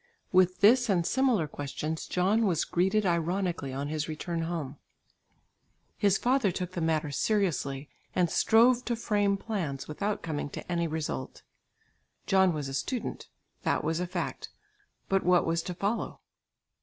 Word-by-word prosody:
With 185 0 +3
this 240 +4 +6
and 175 -4 +2
similar 250 - +2
questions 150 +3 -4
John 200 +5 +2
was 170 -4 +1
greeted 190 +4 +1
ironically 170 -3 0
on 140 +2 -3
his 155 0 -2
return 165 +2 -3
home. 160 -4 -4 1.2
His 200 -2 +3
father 250 -5 +2
took 180 +1 -4
the 175 - -4
matter 160 -2 0
seriously 150 -7 0 0.3
and 180 -1 +3
strove 235 +7 +4
to 240 - 0
frame 205 -3 +1
plans 180 -11 -4
without 200 +7 -3
coming 150 -3 -3
to 180 - -8
any 170 -1 +1
result. 155 -4 -4 0.8
John 190 -1 +4
was 150 -4 -3
a 135 - -6
student; 240 - -3 0.3
that - - 0
was 160 +2 0
a 180 - -2
fact; 175 0 -4 0.6
but 195 0 +2
what 180 0 +4
was 165 +1 0
to 180 +1 -6
follow? 200 +5 -2
180 Hz, 150 wpm, -29 LUFS, 160-200 Hz, 1.2 s, this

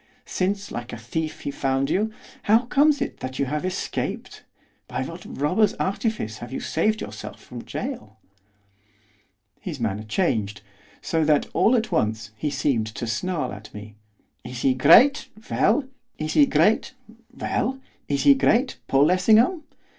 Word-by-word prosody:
Since, 195 +2 -2
like 120 +1 -6
a - - -6
thief 155 +8 -4
he - - -3
found 135 0 0
you, 215 +3 +1 0.4
how 225 +2 +6
comes 285 +2 +3
it - - -7
that 130 0 -6
you 140 - +1
have 150 +4 -3
escaped, 185 0 -4 0.5
by - - -3
what - - -8
robber's 185 +9 +1
artifice 195 - -2
have 120 0 -8
you - - -3
saved 215 +7 0
yourself - - -8
from - - -10
gaol?' 235 - -6 1.4
His 160 -7 -6
manner 110 -3 -2
changed, 110 - -1 0.4
so 160 -1 0
that, 150 -1 +3
all 235 - +4
at 225 -3 -1
once, 110 - -1
he 150 +7 -2
seemed 135 -5 0
to 110 +2 -5
snarl 145 - -2
at 105 0 -11
me. 105 +1 -9 0.5
'Is 125 0 -7
he 135 - +4
great? 230 - +6 0.2
well! 235 +8 +3 0.3
is 155 0 -3
he 290 -2 +6
great, 225 +3 +2 0.4
Paul 255 - +1
Lessingham? 220 - +4
155 Hz, 140 wpm, -24 LUFS, -, 1.4 s, how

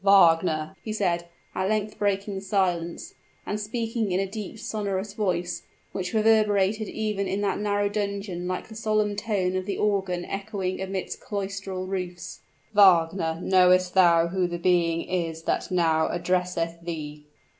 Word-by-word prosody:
"Wagner!" 165 -4 +4
he 220 - -4
said, 175 -5 0 0.3
at 190 +1 -1
length 215 0 -1
breaking 200 -1 0
silence, 180 -4 -1 0.3
and 205 - -2
speaking 225 -1 -2
in 180 - +1
a 195 - +1
deep 210 +2 -6
sonorous 205 -2 -3
voice, 180 -4 -1 0.3
which 180 -2 -3
reverberated 215 -1 +3
even 210 -3 -2
in 195 +2 -1
that 200 -1 0
narrow 205 0 +1
dungeon 200 -3 -3
like 185 0 -3
the 220 - -11
solemn 215 -1 0
tone 200 -4 -1
of 185 0 -2
the 200 - -2
organ 190 -4 0
echoing 195 -2 -3
amidst 190 0 -4
cloistral 195 -2 -4
roofs: 180 -2 -5 0.3
"Wagner, 170 -4 +4
knowest 185 -1 +4
thou 170 -3 +5
who 185 0 0
the 175 0 -4
being 170 -2 +2
is 165 -3 -3
that - - -1
now 165 -3 +2
addresseth 175 -2 -1
thee?" 150 -3 -6
190 Hz, 145 wpm, -26 LUFS, 175-205 Hz, 0.3 s, thou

